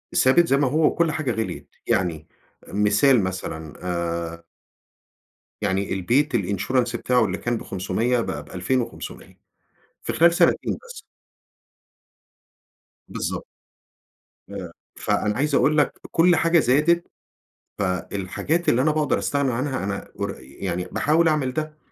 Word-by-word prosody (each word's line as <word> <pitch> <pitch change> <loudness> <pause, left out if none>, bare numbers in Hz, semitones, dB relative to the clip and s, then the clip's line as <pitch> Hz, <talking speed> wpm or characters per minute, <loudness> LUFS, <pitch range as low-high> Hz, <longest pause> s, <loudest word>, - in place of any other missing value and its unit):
ثابت 165 +7 +5
زي 135 - +3
ما 140 -2 +2
هو، 155 +4 +2
وكل 165 0 +2
حاجة 155 -5 -1
غِليِت، 110 0 -4 0.2
يعني 80 -4 0 0.4
مثال 105 +4 +3
مثلًا 80 -4 -5
آآ 85 -1 -3 1.2
يعني 100 -1 0
البيت 120 +9 +1
الinsurance 115 +5 0
بتاعه 125 -1 +2
اللي 95 -1 -2
كان 120 -1 -1
ب500 105 +7 -1
بقى 75 -8 -4
ب2500 115 - -4 0.6
في - - -3
خلال 170 +1 +5
سنتين - - +2
بس. 475 -2 -10 2.1
بالضبط. - - -4 1.0
آآ 95 -4 -7 0.2
فأنا 105 0 0
عايز 145 +2 +1
أقول 155 +1 +3
لك 150 - +1
كل 175 +1 +5
حاجة 165 0 +4
زادت، 155 +7 +3 0.7
فالحاجات 100 - -2
اللي 125 +2 +4
أنا 155 - +3
باقدر 155 -1 +1
أستغني 140 -3 0
عنها 130 -2 -2
أنا 100 -1 -4
ور - - -4
يعني 85 +7 -4
باحاول 155 - +2
أعمل 145 -5 +1
ده، 155 0 -4
120 Hz, 125 wpm, -23 LUFS, 95-150 Hz, 2.1 s, ثابت